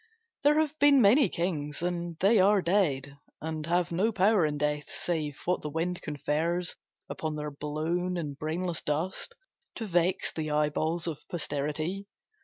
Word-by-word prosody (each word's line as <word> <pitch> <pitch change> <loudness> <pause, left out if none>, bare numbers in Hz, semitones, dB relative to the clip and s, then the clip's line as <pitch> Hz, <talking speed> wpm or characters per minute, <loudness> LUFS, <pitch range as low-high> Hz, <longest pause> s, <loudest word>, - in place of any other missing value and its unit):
There 295 +2 +4
have 310 -1 -1
been 285 -1 +6
many 230 +2 +6
kings, 160 -4 -2
and 175 -1 -2
they 205 +3 +5
are 200 +2 +5
dead, 140 -7 +1 0.2
And 155 0 -4
have 175 0 +1
no 195 +7 +2
power 195 -3 +3
in 150 -1 -3
death 150 0 -1
save 155 -4 -3
what 180 +1 +1
the 150 - -4
wind 170 +4 -2
Confers 160 +4 -1 0.3
upon 155 -1 -4
their 150 0 -4
blown 160 +5 -2
and 150 -4 -4
brainless 165 +4 -2
dust 175 - -2 0.4
To 225 - -4
vex 180 -1 +1
the 155 -1 -3
eyeballs 150 +3 0
of 160 -4 -3
posterity. 155 +4 -2
170 Hz, 155 wpm, -29 LUFS, 150-185 Hz, 0.4 s, been